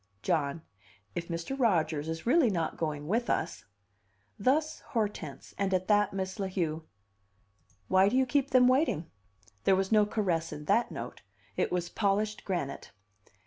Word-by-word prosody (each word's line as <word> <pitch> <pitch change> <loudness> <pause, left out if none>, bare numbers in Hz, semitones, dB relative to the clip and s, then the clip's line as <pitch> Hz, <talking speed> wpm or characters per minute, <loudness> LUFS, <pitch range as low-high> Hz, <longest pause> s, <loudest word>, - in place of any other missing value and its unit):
"John, 155 +1 0 0.5
if 170 - -4
Mr. 170 +9 -3
Rodgers 160 - +1
is 160 0 -4
really 265 +1 +4
not 170 -5 -1
going 150 -2 -3
with 230 +6 0
us 105 +2 -1 0.4
" 100 +1 -41
Thus 310 +3 +1
Hortense; 210 - -3
and 195 -1 +1
at 185 0 -1
that 205 -1 +4
Miss 190 +1 -4
La 195 - -1
Heu: 165 -4 -2 1.0
"Why 190 - +5
do 250 - +1
you 265 - +4
keep 275 +2 +1
them 255 -1 +6
waiting?" 255 - +2 0.5
There 195 - +5
was 190 +1 -1
no 210 -1 +5
caress 180 -7 -1
in 150 0 -7
that 235 +9 +2
note! - - -7 0.3
It - - 0
was 175 -1 -1
polished 210 +2 0
granite. 175 -8 -3
190 Hz, 160 wpm, -30 LUFS, 160-220 Hz, 1.0 s, them